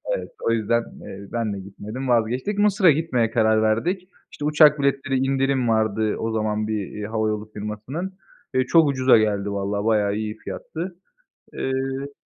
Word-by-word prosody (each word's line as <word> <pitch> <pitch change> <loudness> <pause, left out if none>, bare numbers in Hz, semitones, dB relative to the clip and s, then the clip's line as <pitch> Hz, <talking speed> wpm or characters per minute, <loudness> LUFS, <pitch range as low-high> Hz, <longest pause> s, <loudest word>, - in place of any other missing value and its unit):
Evet, - - -6
o - - +2
yüzden, 115 +1 +1 0.2
eee, 100 +1 -9
ben 115 -3 -1
de 100 - -5
gitmedim, 105 +7 -7
vazgeçtik. 125 - +1
Mısır'a 200 -4 +5
gitmeye 130 -7 0
karar 110 -1 +3
verdik. 175 - 0 0.2
İşte, 150 - -6
uçak 150 -1 +5
biletleri 140 -1 +1
indirim 135 -1 +1
vardı 110 -1 +1
o 115 0 -2
zaman 110 -1 -1
bir, 105 -3 -2
eee, 105 -1 -5
hava 110 0 -1
yolu 105 0 -4
firmasının. 125 - -5 0.4
Eee, 130 0 +2
çok 165 +1 +5
ucuza 130 -3 +5
geldi 105 -2 0
valla, 100 +1 -2
bayağı 105 -2 +2
iyi 110 0 -4
fiyattı. 175 +2 -6 0.6
Eee 135 +1 -3
115 Hz, 160 wpm, -23 LUFS, 110-140 Hz, 0.6 s, Mısır'a